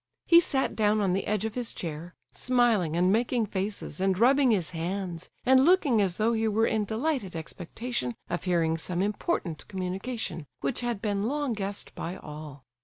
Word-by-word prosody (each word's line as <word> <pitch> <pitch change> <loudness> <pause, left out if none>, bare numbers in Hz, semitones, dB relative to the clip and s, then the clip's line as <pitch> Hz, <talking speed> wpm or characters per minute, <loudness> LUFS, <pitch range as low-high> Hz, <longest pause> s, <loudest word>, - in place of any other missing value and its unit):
He 335 - +8
sat 270 -5 0
down 215 0 +2
on 195 -3 +1
the 195 - -1
edge 210 0 0
of 220 - -3
his 245 -1 -3
chair, 165 +1 -6 0.2
smiling 235 -10 +2
and 180 +2 +3
making 235 +1 +2
faces, 200 -1 -4
and 190 -1 +2
rubbing 265 +4 +5
his 195 -8 +1
hands, 175 +1 -4 0.2
and 260 +1 +6
looking 295 - +4
as 185 -3 0
though 225 +2 +2
he 225 0 +1
were 220 +1 +2
in 215 -2 +1
delighted 225 - -2
expectation 165 - -4
of 175 +1 -3
hearing 165 -3 +1
some 180 +2 0
important 205 - -2
communication, 190 - -4
which 140 - -1
had 240 -4 -2
been 205 -1 0
long 290 -1 -1
guessed 200 -1 -4
by 175 +3 -5
all. 150 -4 -9
205 Hz, 180 wpm, -28 LUFS, 175-235 Hz, 0.2 s, He